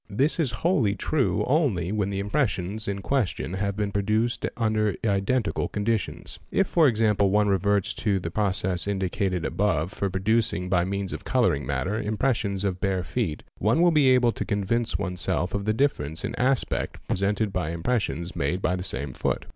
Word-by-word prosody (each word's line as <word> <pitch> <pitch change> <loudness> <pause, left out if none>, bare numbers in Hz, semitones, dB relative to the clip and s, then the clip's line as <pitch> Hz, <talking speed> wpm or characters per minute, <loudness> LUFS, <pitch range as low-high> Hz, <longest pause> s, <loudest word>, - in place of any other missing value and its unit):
This 135 - +1
is 155 -6 +2 0.2
wholly 130 - +3
true 140 +4 0
only 125 - +1
when 105 -2 0
the 100 - -3
impressions 105 -2 -1
in 100 -1 -3
question 120 -9 -1
have 100 +1 -1
been 105 -1 -1
produced 110 +4 0
under 110 -3 +1
iden 100 +5 +1
tical 105 - -2
conditions. 105 -1 -2
If, 195 - +2
for 165 -4 +4
example, 105 -4 +2
one 105 +1 +3
reverts 100 0 +2
to 100 -3 +1
the 85 -2 -5
process 95 -2 0
indicated 95 -2 -1
_ - - -2
above 90 -4 0
for 100 -2 -1
producing 95 -1 0
by 90 -2 +2
means 100 0 -3
of - - -6
colouring 70 -2 +1
matter 90 +11 -1
impressions 105 -3 0
of 95 -2 -2
bare 95 -2 0
feet, 90 -5 -2 0.2
one 110 - +2
will 175 0 +5
be 150 -4 +4
able 125 -2 +4
to - - -4
convince 110 +3 -1
oneself 90 0 -2
of 100 0 -2
the 110 - +2
difference 90 - -1
in - - -3
aspect 130 +1 0
pre - - 0
sented 100 +1 0
by 90 -4 -1
impressions 85 - -2
made 75 +7 -1
by 90 -1 0
the 90 - -4
same 70 -6 -3
foot. - - -2
100 Hz, 185 wpm, -26 LUFS, 95-115 Hz, 0.2 s, will